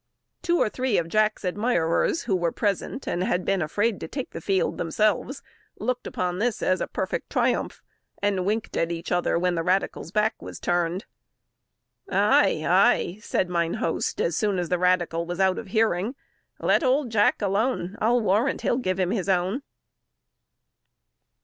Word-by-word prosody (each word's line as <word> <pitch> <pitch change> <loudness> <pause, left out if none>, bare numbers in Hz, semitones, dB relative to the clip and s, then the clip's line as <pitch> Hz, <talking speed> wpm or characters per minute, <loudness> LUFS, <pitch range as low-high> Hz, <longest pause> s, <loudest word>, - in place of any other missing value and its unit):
Two 345 -1 +1
or - - +3
three 255 +1 0
of 165 - 0
Jack's 215 +1 +1
admirers 205 - +1
who 205 -5 0
were 175 -2 0
present, 210 +6 -2
and 175 - -1
had 180 -1 0
been 195 -2 +1
afraid 205 +7 0
to - - -6
take 265 -3 -5
the - - -7
field 195 -2 0
themselves, 215 - 0 0.3
looked 250 0 -2
upon 180 0 -2
this 230 0 -1
as 185 - +1
a - - -1
perfect - - -3
triumph, - - 0 0.4
and 200 -2 0
winked 215 +4 -2
at 165 0 0
each 165 0 -5
other 175 -1 +1
when 180 +1 +1
the 165 - -1
radical's 185 -1 -1
back 215 +2 0
was - - -8
turned. 175 +3 -1 1.0
"Ay, - - +3
ay!" 185 +5 +3
said 185 - 0
mine 170 -1 0
host, 165 - -2
as 165 - 0
soon 205 -1 0
as 175 -2 -2
the 180 - +1
radical 175 -2 +1
was 175 +1 -4
out 190 -1 +2
of 225 - -8
hearing, 220 +2 +1 0.4
"let - - +2
old 260 -1 +1
Jack 210 -2 +3
alone; 200 -1 0
I'll 240 +2 +3
warrant 215 +6 +1
he'll 240 - +1
give 185 -7 -1
him 185 -1 +1
his 195 -4 -2
own!" 190 +7 +1
195 Hz, 170 wpm, -25 LUFS, 175-220 Hz, 1.0 s, or